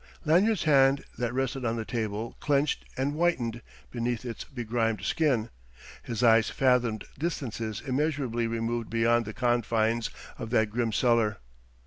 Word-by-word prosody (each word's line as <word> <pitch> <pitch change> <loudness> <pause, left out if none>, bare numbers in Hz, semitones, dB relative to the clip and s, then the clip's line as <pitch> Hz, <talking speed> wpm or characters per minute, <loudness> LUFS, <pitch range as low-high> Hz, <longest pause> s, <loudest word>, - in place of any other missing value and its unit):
Lanyard's 185 +6 +3
hand, 135 -2 +4 0.2
that 120 -1 0
rested 130 +1 -2
on 115 -1 0
the 115 -1 -3
table, 110 -1 -3
clenched 145 0 +1
and 135 +2 0
whitened 135 -9 0 0.3
beneath 120 0 -2
its 120 -2 -5
begrimed 115 -5 -2
skin. 120 -4 +1 0.5
His 115 -1 -3
eyes 115 -1 +5
fathomed 125 -4 +2 0.2
distances 115 -9 -3
immeasurably 135 -4 0
removed 115 0 -2
beyond 115 0 +2
the 110 - -6
confines 115 -2 +1 0.3
of 115 -2 -5
that 110 -3 +2
grim 115 0 0
cellar. 115 -1 +2
120 Hz, 135 wpm, -28 LUFS, 115-135 Hz, 0.5 s, eyes